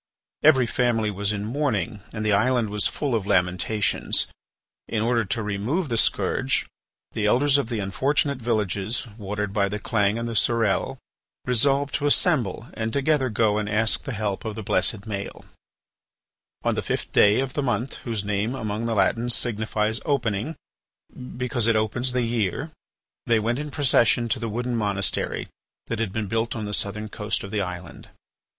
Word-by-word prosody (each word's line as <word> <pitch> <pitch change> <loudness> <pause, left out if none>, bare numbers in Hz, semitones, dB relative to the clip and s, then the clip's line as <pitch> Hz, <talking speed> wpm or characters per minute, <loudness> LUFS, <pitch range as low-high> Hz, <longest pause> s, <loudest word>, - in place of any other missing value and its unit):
Every 135 -5 +6
family 115 -3 +1
was 100 +1 -1
in 100 -1 -3
mourning 115 -4 -1
and 110 -1 -4
the 105 - +3
island 115 +1 +2
was 105 -1 +2
full 145 -4 -2
of 105 -4 0
lamentations. 90 +3 +1 0.6
In 110 -1 -1
order 115 0 +2
to 110 +4 -2
remove 110 - -1
the 115 - 0
scourge, - - +1 0.5
the 105 -1 0
Elders 140 +5 +4
of 120 - -2
the 120 - -2
unfortunate 140 - 0
villages 110 -2 -1
watered 105 0 -3
by 100 -1 +2
the 105 - -3
Clange 105 -1 +1
and 115 0 -3
the 115 - -3
Surelle 110 -3 +1 0.5
resolved 135 +3 +2
to 145 - +1
assemble 130 - +2
and 110 -1 -3
together 140 0 +1
go 105 -1 +2
and 105 -1 -3
ask 110 +1 +2
the - - -5
help 105 -3 -2
of 110 -2 -4
the 110 - -5
blessed 95 +2 +2
Maël. 100 -1 -6 1.2
On - - +2
the - - -1
fifth - - -3
day 105 +3 +5
of 135 -1 -2
the 145 - -1
month 120 -1 -1
whose 110 -4 -4
name 105 +4 -1
among 110 -1 -3
the 115 - 0
Latins 115 +5 +2
signifies 110 -1 0
opening, 125 -1 -1 0.8
because 125 -2 0
it 115 - +4
opens 110 +4 0
the 125 -1 0
year, 115 - -1 0.6
they 115 -1 +4
went 120 +4 -1
in 150 0 -4
procession 120 -5 +3
to - - 0
the 115 - -3
wooden 120 +3 -2
monastery 100 -3 -1 0.4
that 115 - -3
had 115 -4 -1
been 110 +1 -2
built 115 +3 -1
on 110 -2 -3
the 105 - -4
southern 105 +2 0
coast 105 +1 -3
of 100 - -7
the 105 - 0
island. 90 -2 -7
110 Hz, 175 wpm, -24 LUFS, 105-125 Hz, 1.2 s, Every